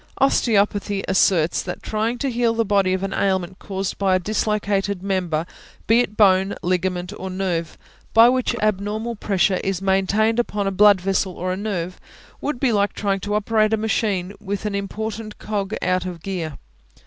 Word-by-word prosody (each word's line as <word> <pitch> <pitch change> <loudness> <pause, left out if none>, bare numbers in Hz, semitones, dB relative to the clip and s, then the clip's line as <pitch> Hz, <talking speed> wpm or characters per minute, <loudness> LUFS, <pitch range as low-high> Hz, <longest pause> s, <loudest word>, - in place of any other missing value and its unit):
Osteopathy 205 -6 +2
asserts 175 -3 +3
that 180 - -6
trying 220 +3 -1
to 275 +1 -1
heal 235 -1 +1
the 230 0 +1
body 195 -2 +2
of 185 0 -2
an 195 - -2
ailment 190 -1 -1
caused 195 -2 -4
by 195 -2 +3
a - - +2
dislocated 200 -1 -1
member, 180 -5 -1 0.4
be 225 +2 +4
it 245 - +2
a - - -20
bone, 195 -2 +4
ligament, 180 +1 -1
or 190 - -5
nerve, 185 -3 -2 0.3
by 225 +1 +7
which 255 -1 +1
abnormal 215 +3 -1
pressure 195 -2 +1
is 195 -2 -1
maintained 195 +4 +2
upon 210 -4 -1
a 195 - 0
blood 205 0 +6
vessel 190 0 0
or 185 +1 -2
a - - -2
nerve, 185 -3 -4 0.4
would 295 -4 -2
be 260 -2 +2
like 205 -1 +1
trying 195 -2 -1
to 205 +2 -2
operate 215 +1 +2
a - - +3
machine 210 -4 -1
with 200 0 -4
an 210 - -1
important 215 +2 -4
cog 205 -1 -3
out 185 0 +1
of 175 -3 -7
gear. 170 -7 -4
200 Hz, 180 wpm, -22 LUFS, 185-215 Hz, 0.4 s, by